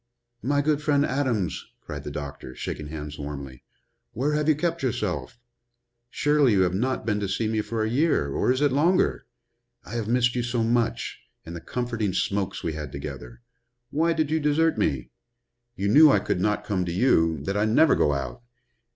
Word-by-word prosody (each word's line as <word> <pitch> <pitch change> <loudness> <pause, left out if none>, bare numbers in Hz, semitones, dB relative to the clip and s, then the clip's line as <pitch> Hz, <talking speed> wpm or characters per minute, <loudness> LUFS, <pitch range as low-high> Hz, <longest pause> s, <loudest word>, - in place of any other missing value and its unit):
"My 145 +2 +1
good 150 0 +1
friend 145 -1 +2
Adams!" 125 - -1
cried - - -7
the - - -5
doctor, 70 -3 -7
shaking 75 - -5
hands 75 -1 -7
warmly. 70 -3 -7 0.5
"Where 140 +6 0
have 150 +1 +1
you 155 - +5
kept 170 +2 -1
yourself? 125 -1 -2 0.7
Surely 145 -3 +3
you 95 - +3
have 90 -1 +2
not 125 +5 -1
been 105 -2 0
to 100 -2 -2
see 110 +3 -1
me 110 0 0
for 110 +1 -2
a - - 0
year, 125 - +1
or 125 - +1
is 130 +2 0
it 145 -2 +3
longer? 165 +7 +2 0.6
I 100 - -9
have 115 -3 -2
missed 125 +1 +2
you 125 - +1
so 120 -1 -1
much 115 0 0 0.3
and 85 - -7
the 85 - -7
comforting 115 -4 -2
smokes 100 0 -1
we 80 - -2
had 75 -2 -6
together? 70 - -8 0.5
Why 165 +3 +2
did 155 -2 -1
you 160 - +2
desert 155 +2 +2
me? 70 - -1 0.6
You 100 - -2
knew 150 +9 +8
I - - +5
could 90 -3 -1
not 105 +1 0
come 95 -4 -1
to 85 - -3
you 85 -6 +3
that 100 +6 -2
I 105 +1 +2
never 140 +8 +5
go 75 - +2
out. 70 - -4
115 Hz, 195 wpm, -25 LUFS, 90-145 Hz, 0.7 s, knew